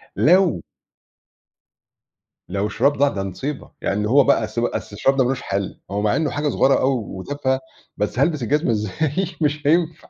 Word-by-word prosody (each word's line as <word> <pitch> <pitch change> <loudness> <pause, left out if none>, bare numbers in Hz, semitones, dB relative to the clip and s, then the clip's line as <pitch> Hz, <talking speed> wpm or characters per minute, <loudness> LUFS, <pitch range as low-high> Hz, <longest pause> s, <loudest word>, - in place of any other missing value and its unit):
لو 175 - +3 1.9
لو 100 +2 -1
الشراب 120 +7 +2
ضاع 145 +1 +4
ده 100 -6 -4
مُصيبة 130 +10 -5
يعني 105 +2 -1
هو 140 +5 +5
بقى 115 - +3
أصل 115 +2 -3
ب - - +2
أصل 105 - -4
الشراب 135 +7 +2
ده 130 - +4
مالوش 125 +1 -1
حَل، 100 -1 -3
هو 100 +1 -1
مع 105 0 +2
إنّه 160 -2 0
حاجة 145 +1 -1
صغيرة 135 0 +3
أوي 135 +1 +2
وتافهة، 130 +8 -2 0.4
بس 105 +4 -2
هالبس 145 -1 +1
الجزمة 150 +3 +1
إزاي؟ 135 - -1 0.2
مش 150 -1 0
هينفع. 165 +1 +1
135 Hz, 170 wpm, -21 LUFS, 105-150 Hz, 1.9 s, هو